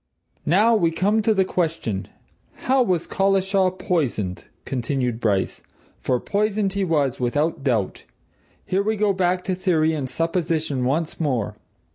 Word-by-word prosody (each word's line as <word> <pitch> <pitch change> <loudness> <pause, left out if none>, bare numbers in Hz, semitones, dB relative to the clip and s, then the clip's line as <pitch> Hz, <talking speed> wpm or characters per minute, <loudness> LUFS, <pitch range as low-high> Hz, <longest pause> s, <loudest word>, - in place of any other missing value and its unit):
"Now 210 +8 +4
we 170 -6 +3
come 195 +7 +1
to 220 - +2
the 190 -3 +3
question 160 - -2 0.6
how 265 +1 +4
was 180 -8 +1
Collishaw 195 0 +2
poisoned?" 145 - -2 0.2
continued 125 -2 -2
Bryce. 100 -5 0 0.4
"For 125 -1 0
poisoned 205 - 0
he 200 0 0
was, 145 -7 +1
without 145 +5 0
doubt. 115 -8 -1 0.6
Here 190 +2 +1
we 215 +2 0
go 210 -1 +2
back 180 -1 +1
to 190 - -1
theory 165 -4 +1
and 140 -4 -3
supposition 165 -5 -1
once 155 +5 -1
more. 130 -9 -1
165 Hz, 140 wpm, -23 LUFS, 135-195 Hz, 0.6 s, Now